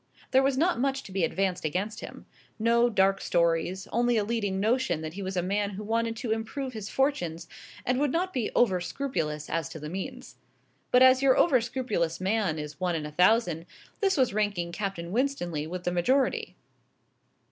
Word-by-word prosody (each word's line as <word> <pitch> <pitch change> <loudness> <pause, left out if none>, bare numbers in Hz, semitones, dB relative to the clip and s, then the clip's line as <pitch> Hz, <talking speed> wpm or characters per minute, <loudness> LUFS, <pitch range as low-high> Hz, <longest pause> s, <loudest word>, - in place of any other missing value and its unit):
There 265 - +5
was 270 -1 +1
not 340 -1 +2
much 270 +1 0
to - - -11
be 190 -2 0
advanced 180 +2 0
against 190 +8 -2
him. - - -9 0.3
No 235 +2 +3
dark 195 -2 +2
stories; 170 +2 0
only 240 +1 +2
a 210 - +2
leading 205 -3 -1
notion 215 -6 +1
that 155 0 -5
he 200 - -6
was 190 -1 -4
a 175 - +1
man 200 +2 0
who 205 +1 -7
wanted 230 +1 0
to 230 -1 -4
improve 240 +4 -3
his 215 -3 -6
fortunes, 175 - -1 0.4
and 250 +1 +1
would 290 -2 +1
not 365 +4 -1
be 245 -5 -1
over 190 -7 +3
scrupulous 160 - -3
as 165 0 -2
to 160 - -8
the 150 0 -6
means. 250 +9 -7 0.5
But 250 +1 +6
as 260 0 +6
your 270 -1 +4
over 260 -8 +4
scrupulous 220 -10 -2
man 190 -3 0
is 150 +1 -7
one 180 -2 0
in 155 -2 -3
a 150 - -6
thousand, 180 -1 +2 0.3
this 390 -3 +2
was 255 -6 +2
ranking 200 -5 -1
Captain 175 -3 -4
Winstanley 180 - -1
with 180 +2 -5
the 180 - 0
majority. 255 +11 +1
205 Hz, 190 wpm, -28 LUFS, 175-250 Hz, 0.5 s, But